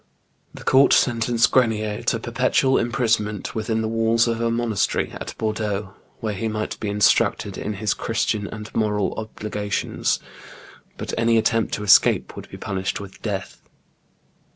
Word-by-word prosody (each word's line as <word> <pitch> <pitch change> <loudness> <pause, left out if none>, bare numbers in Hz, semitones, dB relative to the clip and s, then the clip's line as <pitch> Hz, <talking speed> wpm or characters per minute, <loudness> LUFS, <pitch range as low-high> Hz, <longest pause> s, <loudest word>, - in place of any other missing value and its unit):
The - - -10
court 135 +1 +5
sentenced 115 -1 +3
Grenier 110 -4 +1
to - - +2
perpetual 135 0 +1
imprisonment 115 -4 0
within 110 0 -1
the - - -1
walls 115 +1 +2
of 115 0 -1
a 115 - +1
monastery 115 -3 0
at - - -7
Bordeaux, 105 -3 -2 0.3
where 110 -2 -2
he 110 +3 -3
might 110 0 -3
be 105 - -3
instructed 105 0 +2
in 105 - -4
his 105 0 -1
Christian 110 -2 -1
and 105 +1 -8
moral 105 -2 0
obligations; 105 -2 -2 0.8
but - - -5
any 115 0 +3
attempt 115 0 +1
to 105 - -6
escape 100 -1 +4
would - - -9
be - - -9
punished 95 0 -3
with 100 -1 -11
death. 100 -4 -4
110 Hz, 150 wpm, -22 LUFS, 105-115 Hz, 0.8 s, court